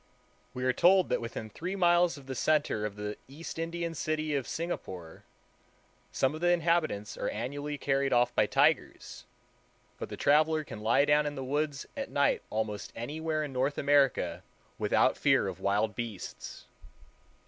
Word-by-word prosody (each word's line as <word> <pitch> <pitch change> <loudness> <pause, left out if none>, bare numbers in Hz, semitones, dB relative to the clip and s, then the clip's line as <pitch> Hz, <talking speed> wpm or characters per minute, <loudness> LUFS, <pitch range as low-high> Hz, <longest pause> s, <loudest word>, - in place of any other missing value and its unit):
We 125 - -4
are 130 0 +2
told 185 +5 +4
that 125 - 0
within 115 -1 -5
three 180 - -5
miles 175 -3 +3
of 140 - -13
the 135 - -5
center 145 -7 +1
of 100 - -10
the 105 0 -5
East 155 +4 -8
Indian 170 0 -3
city 155 -1 -2
of 140 -3 -1
Singapore, 95 - -5 0.9
some 130 +1 +1
of 155 - -7
the 175 - +3
inhabitants 165 -11 +1
are - - -1
annually 145 +6 -4
carried 135 0 0
off 120 -1 +3
by - - +3
tigers; - - 0 0.7
but - - -5
the - - -7
traveler 155 +2 +3
can 110 - -9
lie 110 +6 +3
down 150 0 +3
in 145 - -4
the 135 - -4
woods 145 +1 -2
at 275 -1 -4
night 140 0 +2
almost 105 -1 -3
anywhere 155 +6 -2
in 145 -3 -6
North 135 +3 0
America 140 -2 +2 0.4
without - - +2
fear - - +3
of - - -5
wild 105 +2 +1
beasts. 115 -6 -7
145 Hz, 165 wpm, -30 LUFS, 120-160 Hz, 0.9 s, told